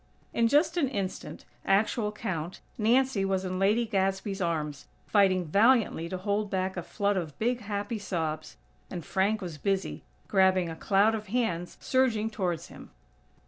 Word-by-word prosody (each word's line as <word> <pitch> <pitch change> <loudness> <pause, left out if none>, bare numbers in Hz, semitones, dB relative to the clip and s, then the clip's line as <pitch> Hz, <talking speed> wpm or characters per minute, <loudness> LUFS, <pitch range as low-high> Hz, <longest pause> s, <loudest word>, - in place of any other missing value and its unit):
In 230 0 +3
just 310 +7 +3
an 300 -5 +3
instant, 200 -7 -5 0.2
actual 210 +2 +2
count, 185 -6 -4 0.2
Nancy 235 -1 +2
was 190 -1 0
in 185 0 -3
Lady 210 +5 +3
Gadsby's 195 -1 -1
arms, 155 -4 -2 0.2
fighting 190 -3 +3
valiantly 205 -2 +3
to 185 - -3
hold 205 +2 -1
back 190 0 -1
a 175 - -3
flood 200 +3 -1
of 160 -5 -4
big, 240 +2 0
happy 205 +1 -3
sobs; 160 -6 -3 0.3
and 175 -5 -6
Frank 195 +4 +1
was 165 -5 -6
busy, 195 +3 -1 0.3
grabbing 190 -3 +3
a 165 - -5
cloud 200 +5 +3
of 215 -1 -4
hands 190 -6 -1
surging 230 -4 +1
towards 180 -6 -2
him. - - -12
195 Hz, 155 wpm, -28 LUFS, 185-220 Hz, 0.3 s, In